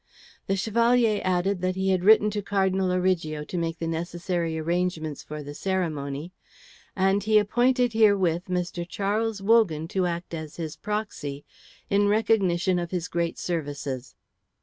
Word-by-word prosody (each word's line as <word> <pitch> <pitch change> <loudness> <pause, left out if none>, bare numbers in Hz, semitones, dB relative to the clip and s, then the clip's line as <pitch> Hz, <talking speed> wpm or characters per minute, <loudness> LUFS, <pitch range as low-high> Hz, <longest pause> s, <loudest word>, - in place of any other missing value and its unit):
The 195 - +1
Chevalier 230 +1 +2
added 185 +1 0
that 185 0 0
he 190 0 0
had 185 -1 +1
written 210 +1 +6
to 205 0 -2
Cardinal 190 -2 +1
Origo 180 -5 0
to 165 - -8
make 165 0 -2
the 165 - -4
necessary 170 0 -2
arrangements 165 -2 -2
for 150 0 -7
the 145 +1 -8
ceremony, 160 -3 -3 0.6
and 195 +1 +2
he 215 0 +4
appointed 245 +3 +2
herewith 195 -6 +3
Mr. 180 -1 -2
Charles 210 +1 -1
Wogan 195 -8 +3
to 185 -1 0
act 170 0 -4
as 155 -2 -6
his 160 -3 -5
proxy, 205 -10 -4 0.4
in 205 +1 +3
recognition 195 -4 +2
of 175 -1 -4
his 180 -1 -3
great 170 -1 -2
services. 145 -6 -4
180 Hz, 150 wpm, -26 LUFS, 165-205 Hz, 0.6 s, written